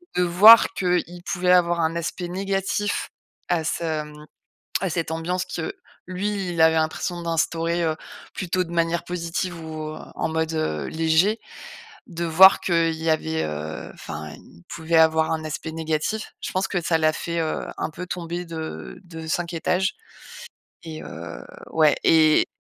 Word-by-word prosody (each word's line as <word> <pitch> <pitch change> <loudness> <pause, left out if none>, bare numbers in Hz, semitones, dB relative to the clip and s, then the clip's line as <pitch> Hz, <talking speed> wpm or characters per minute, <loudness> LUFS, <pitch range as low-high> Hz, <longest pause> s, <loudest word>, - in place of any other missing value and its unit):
de 180 - +3
voir 200 +6 +8
qu'il 180 -1 -1
pouvait 180 -1 +1
avoir 175 -1 +3
un 160 0 0
aspect 170 +1 -3
négatif 195 +2 -1 0.4
à 175 -2 +1
ce, 160 -1 -2
mmh 150 0 -13 0.6
à 190 - 0
cette 165 0 -2
ambiance 175 +3 -2
que 165 - -5 0.3
lui, 195 +1 -2
il 170 -1 -3
avait 160 0 +5
l'impression 160 +2 -1
d'instaurer, 165 +1 0
heu, 160 -1 0 0.4
plutôt 185 0 -1
de 170 - -11
manière 170 0 +1
positive 175 +1 -3
ou 155 -1 -6 0.2
en - - -1
mode, 160 0 -1
heu, 80 - -1
léger. 165 +7 +2 0.7
De 170 -1 -4
voir 180 +4 +7
qu'il 165 -2 +1
y 160 +1 -4
avait, 160 0 0
heu, 75 +1 -5
enfin 75 0 -7
il 85 - -17
pouvait 165 0 -1
avoir 160 0 +4
un 160 -1 -2
aspect 155 +1 -5
négatif. 160 +6 -2
Je - - -4
pense 190 +1 0
que 190 - -1
ça 165 0 +2
l'a 155 -1 +3
fait, 170 +2 -4
heu, 160 -1 -2
un - - -2
peu 180 +4 -7
tomber 175 0 -4
de 165 +2 -7
de 165 -2 -9
5 170 +1 -2
étages, 180 +3 0 0.9
et 160 -1 -7
heu, 85 +1 -8 0.3
ouais, 155 -2 +5
et 155 -1 +5
165 Hz, 160 wpm, -23 LUFS, 160-180 Hz, 0.9 s, voir